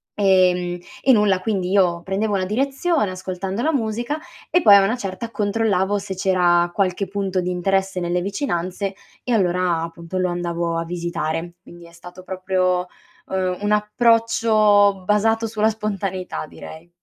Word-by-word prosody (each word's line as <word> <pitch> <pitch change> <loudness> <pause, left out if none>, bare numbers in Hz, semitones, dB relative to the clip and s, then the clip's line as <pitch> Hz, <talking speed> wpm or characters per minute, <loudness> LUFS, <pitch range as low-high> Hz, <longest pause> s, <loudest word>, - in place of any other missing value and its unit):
ehm, 180 -3 +2 0.3
e 265 - +5
nulla 210 -4 +3
quindi 190 -4 -1
io 180 -4 +2
prendevo 200 +3 -1
una 190 -1 0
direzione 270 - 0
ascoltando 185 +2 -4
la 320 - +1
musica 240 +3 -2 0.3
e 355 - +4
poi 205 -8 +8
a 200 - +6
una 220 +6 0
certa 200 +1 -5
controllavo 205 -2 0
se 200 -1 -5
c'era 180 -2 +2
qualche 195 0 0
punto 195 -1 -2
di 180 - -3
interesse 190 +1 0
nelle 175 +1 -1
vicinanze 195 -2 -3 0.3
e 250 - -1
allora, 180 -4 +1
appunto, 170 +2 -6
lo 185 0 +1
andavo 170 -1 -2
a 165 - -2
visitare. 170 -1 -3
Quindi 170 -1 -14
è - - -17
stato 180 +2 -12
proprio, 185 -1 0 0.5
ehm, 185 -1 -1
un 205 0 -1
approccio 210 -2 +3
basato 225 +3 +2
sulla 220 0 +1
spontaneità 195 -5 -4
direi. 160 +3 -11
190 Hz, 150 wpm, -21 LUFS, 180-210 Hz, 0.5 s, poi